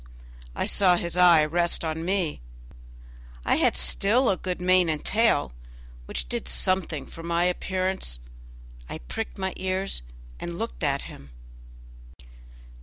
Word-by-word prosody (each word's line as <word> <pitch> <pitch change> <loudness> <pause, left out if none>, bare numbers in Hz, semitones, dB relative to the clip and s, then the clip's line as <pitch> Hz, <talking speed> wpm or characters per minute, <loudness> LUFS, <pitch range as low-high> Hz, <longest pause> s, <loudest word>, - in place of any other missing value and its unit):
I - - -1
saw 185 -3 +4
his 170 0 -3
eye 175 -4 +6
rest 170 +3 +1
on 160 0 -3
me; 180 - -1 1.0
I - - +3
had - - +2
still 200 - +3
a - - +1
good 180 -1 -4
mane 180 -1 +3
and 155 -1 -2
tail, 215 - +2 0.5
which 60 -1 -4
did - - -3
something 155 - 0
for 165 - -11
my 170 +1 0
appearance. 185 - -1 0.7
I - - -5
pricked 215 - -6
my 190 -1 -2
ears 190 - -2 0.4
and 170 0 -5
looked 225 -4 -5
at 140 -1 0
him. 70 - -11
175 Hz, 135 wpm, -26 LUFS, 155-190 Hz, 1.0 s, eye